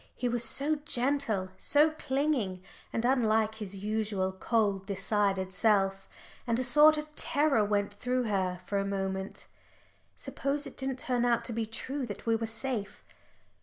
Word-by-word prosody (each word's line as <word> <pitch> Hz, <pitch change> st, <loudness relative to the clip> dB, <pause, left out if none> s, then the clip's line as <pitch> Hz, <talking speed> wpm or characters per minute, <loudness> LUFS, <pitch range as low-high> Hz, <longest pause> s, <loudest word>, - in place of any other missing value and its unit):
He 250 Hz, -, -1 dB
was 240 Hz, -1 st, 0 dB
so 285 Hz, +6 st, +3 dB
gentle, 260 Hz, -8 st, 0 dB
so 300 Hz, +2 st, +4 dB
clinging, 265 Hz, -11 st, -1 dB, 0.3 s
and 230 Hz, -, -1 dB
unlike 220 Hz, -4 st, +2 dB
his 200 Hz, -2 st, -6 dB
usual 205 Hz, -1 st, -1 dB
cold 195 Hz, -1 st, 0 dB
decided 195 Hz, -1 st, 0 dB
self. 195 Hz, -2 st, +1 dB, 0.4 s
And 230 Hz, -1 st, +1 dB
a 255 Hz, -, 0 dB
sort 300 Hz, +4 st, +6 dB
of 300 Hz, 0 st, -6 dB
terror 285 Hz, -6 st, +2 dB
went 205 Hz, 0 st, 0 dB
through 250 Hz, +4 st, -1 dB
her 190 Hz, -5 st, -1 dB
for 200 Hz, -, -1 dB
a -, -, 0 dB
moment, 195 Hz, -1 st, -3 dB, 0.7 s
"Suppose 285 Hz, +1 st, -3 dB
it -, -, -9 dB
didn't 265 Hz, -1 st, -3 dB
turn 250 Hz, -2 st, -1 dB
out 235 Hz, -1 st, +2 dB
to 235 Hz, -, -4 dB
be 225 Hz, 0 st, -2 dB
true 260 Hz, +4 st, -4 dB
that 205 Hz, -, -8 dB
we 230 Hz, -1 st, +3 dB
were 225 Hz, 0 st, -2 dB
safe." 225 Hz, -2 st, -4 dB
225 Hz, 160 wpm, -30 LUFS, 200-265 Hz, 0.7 s, sort